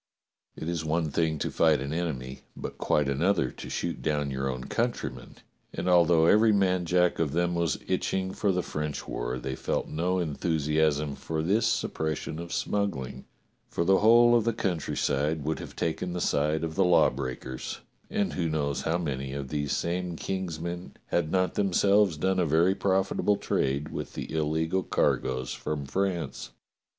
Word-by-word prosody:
It 80 Hz, -, -6 dB
is 85 Hz, -2 st, -2 dB
one 80 Hz, 0 st, 0 dB
thing 80 Hz, +1 st, +1 dB
to -, -, -2 dB
fight 80 Hz, -2 st, +4 dB
an 70 Hz, +3 st, -4 dB
enemy, 65 Hz, -6 st, -3 dB, 0.2 s
but -, -, -6 dB
quite 75 Hz, -2 st, +2 dB
another 70 Hz, 0 st, +1 dB
to -, -, -9 dB
shoot -, -, -3 dB
down 75 Hz, -2 st, 0 dB
your 65 Hz, 0 st, -2 dB
own 65 Hz, -1 st, -4 dB
countrymen, -, -, -3 dB, 0.4 s
and -, -, -3 dB
al 90 Hz, -1 st, +6 dB
though 80 Hz, -1 st, +4 dB
every 110 Hz, +5 st, +5 dB
man 95 Hz, -3 st, +2 dB
jack 90 Hz, +1 st, +2 dB
of 75 Hz, -4 st, 0 dB
them 85 Hz, +1 st, +1 dB
was 85 Hz, -4 st, 0 dB
itching 95 Hz, 0 st, -1 dB
for 100 Hz, -, +1 dB
the 90 Hz, -1 st, 0 dB
French 75 Hz, -1 st, -4 dB
war, -, -, -3 dB
they 65 Hz, +2 st, -4 dB
felt -, -, -2 dB
no 90 Hz, +4 st, 0 dB
enthusiasm 75 Hz, -2 st, 0 dB
for 80 Hz, +2 st, -3 dB
this 105 Hz, +7 st, +2 dB
suppres 80 Hz, -8 st, -1 dB
sion 80 Hz, -, -6 dB
of 85 Hz, 0 st, -7 dB
smuggling, 75 Hz, -14 st, -2 dB, 0.4 s
for 85 Hz, -, -1 dB
the 95 Hz, +2 st, +5 dB
whole 120 Hz, +2 st, +6 dB
of 115 Hz, -, +4 dB
the 115 Hz, +1 st, +1 dB
countryside 80 Hz, -6 st, -1 dB
would 80 Hz, +2 st, -1 dB
have -, -, -9 dB
taken 85 Hz, +2 st, -2 dB
the 90 Hz, -, -2 dB
side 75 Hz, 0 st, +1 dB
of 80 Hz, -1 st, -2 dB
the 95 Hz, -, +3 dB
lawbreakers, 65 Hz, -7 st, 0 dB, 0.3 s
and 100 Hz, -, 0 dB
who 85 Hz, -2 st, -1 dB
knows 70 Hz, -2 st, -1 dB
how 80 Hz, +2 st, 0 dB
many 70 Hz, -5 st, -3 dB
of 70 Hz, -1 st, -5 dB
these 75 Hz, -1 st, -2 dB
same 90 Hz, 0 st, -1 dB
King's 90 Hz, -2 st, -3 dB
men 85 Hz, +2 st, -5 dB, 0.2 s
had 85 Hz, -3 st, 0 dB
not 95 Hz, -1 st, +1 dB
them 100 Hz, -2 st, 0 dB
selves 100 Hz, -4 st, +4 dB
done 95 Hz, +4 st, +1 dB
a 90 Hz, -, +3 dB
very 85 Hz, +5 st, +4 dB
profitable 95 Hz, +1 st, +1 dB
trade 70 Hz, -2 st, -1 dB
with -, -, -6 dB
the -, -, -6 dB
illegal 80 Hz, +3 st, 0 dB
car -, -, +2 dB
goes 65 Hz, -1 st, -4 dB
from 75 Hz, -2 st, -4 dB
France. 90 Hz, +3 st, -2 dB
80 Hz, 180 wpm, -28 LUFS, 75-90 Hz, 0.4 s, al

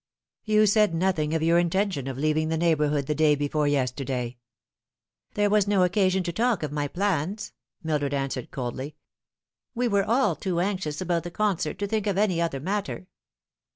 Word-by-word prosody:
" -, -, -68 dB
You 215 Hz, -1 st, +4 dB
said 210 Hz, -4 st, +3 dB
nothing 165 Hz, -3 st, 0 dB
of 160 Hz, -, 0 dB
your 170 Hz, +1 st, +4 dB
intention 175 Hz, -5 st, 0 dB
of 135 Hz, -2 st, -4 dB
leaving 155 Hz, +2 st, +1 dB
the 160 Hz, -, 0 dB
neighbour 160 Hz, -2 st, +2 dB
hood 145 Hz, -1 st, 0 dB
the 150 Hz, -, 0 dB
day 150 Hz, -1 st, +3 dB
before 145 Hz, +1 st, 0 dB
yesterday." 125 Hz, -3 st, -1 dB, 0.5 s
" -, -, -52 dB
There 205 Hz, 0 st, +2 dB
was 210 Hz, -1 st, +3 dB
no 200 Hz, -2 st, +3 dB
occasion 185 Hz, 0 st, +2 dB
to 170 Hz, -1 st, -3 dB
talk 230 Hz, -3 st, +1 dB
of 150 Hz, -, -3 dB
my 145 Hz, -1 st, -1 dB
plans," 195 Hz, +3 st, -2 dB, 0.3 s
Mildred 150 Hz, -3 st, -1 dB
an 135 Hz, 0 st, -1 dB
swered 130 Hz, -, -5 dB
coldly. 130 Hz, +3 st, -5 dB, 0.4 s
" -, -, -63 dB
We 245 Hz, +1 st, +1 dB
were 200 Hz, -3 st, +2 dB
all 230 Hz, -6 st, +2 dB
too 175 Hz, +3 st, -2 dB
anxious 180 Hz, -5 st, -2 dB
about 175 Hz, -2 st, 0 dB
the 175 Hz, -, -6 dB
concert 180 Hz, -4 st, -1 dB
to 200 Hz, -, -2 dB
think 215 Hz, 0 st, -1 dB
of 195 Hz, -2 st, 0 dB
any 190 Hz, -5 st, +2 dB
other 165 Hz, -5 st, -1 dB
matter." 195 Hz, +3 st, -3 dB
170 Hz, 195 wpm, -26 LUFS, 150-200 Hz, 0.5 s, You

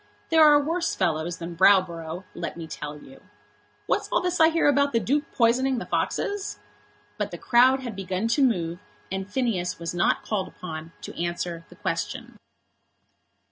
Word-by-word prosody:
There 320 Hz, -1 st, +6 dB
are 295 Hz, -1 st, +7 dB
worse 335 Hz, +4 st, -1 dB
fellows 165 Hz, +1 st, -1 dB
than 170 Hz, 0 st, -7 dB
Browborough, 175 Hz, -2 st, +3 dB
let -, -, -5 dB
me 165 Hz, -, -6 dB
tell 150 Hz, -1 st, -7 dB
you. 270 Hz, -, -15 dB, 0.6 s
What's -, -, 0 dB
all -, -, +2 dB
this 360 Hz, -1 st, -1 dB
I 320 Hz, 0 st, +7 dB
hear 330 Hz, -2 st, +2 dB
about 280 Hz, 0 st, +3 dB
the 230 Hz, -, +3 dB
Duke 285 Hz, -, -1 dB
poisoning 255 Hz, +3 st, +2 dB
the 235 Hz, -, -4 dB
foxes?" 405 Hz, -1 st, -2 dB, 0.6 s
But -, -, -1 dB
the -, -, -7 dB
crowd 255 Hz, +2 st, +4 dB
had 240 Hz, -5 st, -6 dB
begun 190 Hz, +2 st, -2 dB
to 280 Hz, -, +2 dB
move, 175 Hz, -10 st, +1 dB, 0.3 s
and 190 Hz, +1 st, -4 dB
Phineas 215 Hz, -8 st, -1 dB
was 170 Hz, 0 st, -4 dB
not 175 Hz, -, +1 dB
called 205 Hz, -3 st, -1 dB
upon 160 Hz, -2 st, -8 dB
to -, -, -5 dB
answer 175 Hz, -1 st, -3 dB
the -, -, -14 dB
question. -, -, -4 dB
205 Hz, 170 wpm, -25 LUFS, 170-275 Hz, 0.6 s, are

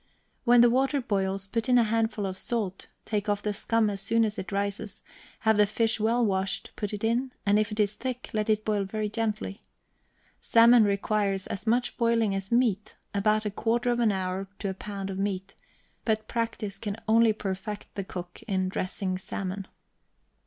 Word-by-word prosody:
When 240 Hz, 0 st, +7 dB
the 240 Hz, -, +7 dB
water 270 Hz, +3 st, +2 dB
boils 195 Hz, -4 st, -1 dB
put 230 Hz, +5 st, -2 dB
in 250 Hz, -, +6 dB
a 240 Hz, -, +6 dB
handful 225 Hz, -1 st, 0 dB
of 190 Hz, -1 st, -3 dB
salt, 195 Hz, -1 st, -2 dB, 0.2 s
take 210 Hz, -1 st, -1 dB
off 205 Hz, 0 st, 0 dB
the 210 Hz, -, 0 dB
scum 225 Hz, +2 st, +1 dB
as 200 Hz, -1 st, -1 dB
soon 225 Hz, +3 st, +3 dB
as 215 Hz, 0 st, -3 dB
it 190 Hz, -, -6 dB
rises; 200 Hz, 0 st, -3 dB, 0.4 s
have 220 Hz, -1 st, +3 dB
the 210 Hz, 0 st, +5 dB
fish 225 Hz, +1 st, +1 dB
well 230 Hz, +3 st, +2 dB
washed, 190 Hz, -1 st, -1 dB
put 210 Hz, -, -3 dB
it 210 Hz, 0 st, -5 dB
in, 240 Hz, +4 st, +1 dB
and 205 Hz, +1 st, +4 dB
if 215 Hz, -1 st, 0 dB
it 210 Hz, -, -5 dB
is 205 Hz, -1 st, +3 dB
thick, 250 Hz, +3 st, -5 dB
let 215 Hz, 0 st, -1 dB
it 215 Hz, 0 st, +2 dB
boil 210 Hz, -2 st, +1 dB
very 210 Hz, +2 st, -3 dB
gently. 215 Hz, -2 st, -2 dB, 0.8 s
Salmon 230 Hz, 0 st, +6 dB
requires 200 Hz, -1 st, 0 dB
as 205 Hz, +3 st, -5 dB
much 245 Hz, +2 st, +1 dB
boiling 230 Hz, -3 st, +2 dB
as 195 Hz, +1 st, -4 dB
meat; 225 Hz, -4 st, +1 dB, 0.2 s
about 215 Hz, +2 st, +2 dB
a 210 Hz, -, -1 dB
quarter 235 Hz, +4 st, 0 dB
of 240 Hz, -, 0 dB
an 230 Hz, -3 st, +4 dB
hour 190 Hz, 0 st, -2 dB
to 200 Hz, -, -3 dB
a -, -, -2 dB
pound 195 Hz, 0 st, -5 dB
of 190 Hz, -, -5 dB
meat; 195 Hz, -1 st, -2 dB, 0.5 s
but 215 Hz, -1 st, 0 dB
practice 225 Hz, -4 st, -3 dB
can 205 Hz, 0 st, -4 dB
only 225 Hz, +1 st, +5 dB
perfect 205 Hz, 0 st, -5 dB
the 200 Hz, -, -3 dB
cook 180 Hz, -2 st, -8 dB
in 190 Hz, -3 st, 0 dB
dressing 185 Hz, 0 st, -2 dB
salmon. 190 Hz, 0 st, -5 dB
210 Hz, 190 wpm, -28 LUFS, 195-230 Hz, 0.8 s, When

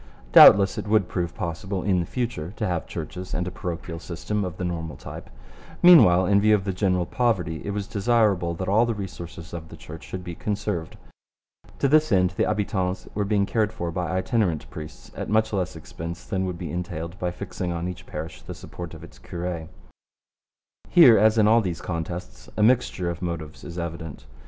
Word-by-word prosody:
Doubtless 100 Hz, 0 st, +8 dB
it -, -, -6 dB
would 105 Hz, -3 st, +3 dB
prove 85 Hz, -2 st, -3 dB
possible 95 Hz, 0 st, -4 dB
in 95 Hz, -3 st, +2 dB
the 85 Hz, -, -2 dB
future 115 Hz, -9 st, -3 dB
to 105 Hz, -, -2 dB
have 90 Hz, -4 st, -2 dB
churches 90 Hz, 0 st, -6 dB
and 90 Hz, 0 st, -2 dB
a -, -, -4 dB
parochial 85 Hz, -3 st, -5 dB
system 100 Hz, +5 st, -3 dB
of 90 Hz, -2 st, -5 dB
the 95 Hz, -, -4 dB
normal 80 Hz, -4 st, -4 dB
type. -, -, -9 dB, 0.5 s
Meanwhile, 95 Hz, -, +8 dB
in 100 Hz, +1 st, +4 dB
view 110 Hz, +1 st, +5 dB
of 100 Hz, -, -2 dB
the 95 Hz, -1 st, -2 dB
general 90 Hz, -2 st, +1 dB
poverty 90 Hz, -9 st, 0 dB
it -, -, -5 dB
was 100 Hz, 0 st, -2 dB
desirable 100 Hz, -5 st, +1 dB
that 95 Hz, +2 st, -4 dB
all 110 Hz, +5 st, +3 dB
the 115 Hz, -, -1 dB
resources 85 Hz, -4 st, -8 dB
of 80 Hz, -2 st, -7 dB
the -, -, -11 dB
Church 80 Hz, +1 st, -10 dB
should 95 Hz, -1 st, -7 dB
be 85 Hz, -1 st, -6 dB
conserved. 100 Hz, -3 st, -3 dB, 0.8 s
To 140 Hz, -, +2 dB
this 155 Hz, +1 st, +4 dB
end 90 Hz, -2 st, +3 dB
the 90 Hz, -, 0 dB
habitants 95 Hz, -3 st, -1 dB
were 105 Hz, -, 0 dB
being 100 Hz, -1 st, +2 dB
cared 110 Hz, 0 st, 0 dB
for 85 Hz, -5 st, -4 dB
by 90 Hz, +1 st, -2 dB
itinerant 95 Hz, -, 0 dB
priests 80 Hz, 0 st, -9 dB
at -, -, -5 dB
much 110 Hz, +1 st, +2 dB
less 90 Hz, -4 st, -1 dB
expense 85 Hz, +1 st, -7 dB
than 95 Hz, -1 st, -1 dB
would 90 Hz, -2 st, -4 dB
be 85 Hz, -1 st, -6 dB
entailed 85 Hz, 0 st, -5 dB
by 90 Hz, -, -1 dB
fixing 90 Hz, -1 st, -5 dB
on 85 Hz, +1 st, -3 dB
each 90 Hz, -1 st, -7 dB
parish 80 Hz, +2 st, -7 dB
the -, -, -8 dB
support 85 Hz, -2 st, -8 dB
of -, -, -12 dB
its -, -, -14 dB
cure. 85 Hz, -2 st, -5 dB, 1.2 s
Here, 130 Hz, -, +8 dB
as 110 Hz, +2 st, +4 dB
in 105 Hz, -1 st, +5 dB
all 115 Hz, +2 st, +5 dB
these 90 Hz, -5 st, -3 dB
contests, 85 Hz, -6 st, -6 dB
a 105 Hz, -, +3 dB
mixture 110 Hz, -7 st, +2 dB
of 85 Hz, -, -8 dB
motives 85 Hz, -3 st, -5 dB
is 85 Hz, -, -8 dB
evident. 80 Hz, -3 st, -6 dB
90 Hz, 200 wpm, -25 LUFS, 85-105 Hz, 1.2 s, Doubtless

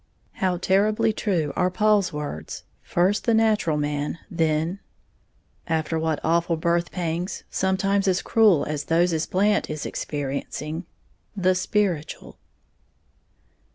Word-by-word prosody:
How 185 Hz, -3 st, -1 dB
terribly 205 Hz, +4 st, +2 dB
true 175 Hz, -9 st, -1 dB
are 180 Hz, 0 st, +2 dB
Paul's 205 Hz, 0 st, +2 dB
words, 145 Hz, -, -6 dB, 0.2 s
"First 185 Hz, +4 st, +1 dB
the 230 Hz, -, +3 dB
natural 215 Hz, -8 st, +2 dB
man, 145 Hz, +1 st, -2 dB
then" 165 Hz, +2 st, 0 dB, 0.9 s
after 160 Hz, 0 st, 0 dB
what 160 Hz, -1 st, 0 dB
awful 170 Hz, +1 st, +1 dB
birth 170 Hz, +1 st, 0 dB
pangs, 175 Hz, 0 st, -3 dB
sometimes 195 Hz, +1 st, +1 dB
as 185 Hz, 0 st, +1 dB
cruel 215 Hz, -9 st, +4 dB
as 150 Hz, -1 st, -3 dB
those 170 Hz, +1 st, +2 dB
Blant 205 Hz, +2 st, +1 dB
is 155 Hz, -1 st, -4 dB
experiencing! 150 Hz, +3 st, -4 dB, 0.5 s
"the 185 Hz, -1 st, +3 dB
spiritual". 180 Hz, -4 st, -2 dB
175 Hz, 115 wpm, -24 LUFS, 155-195 Hz, 0.9 s, cruel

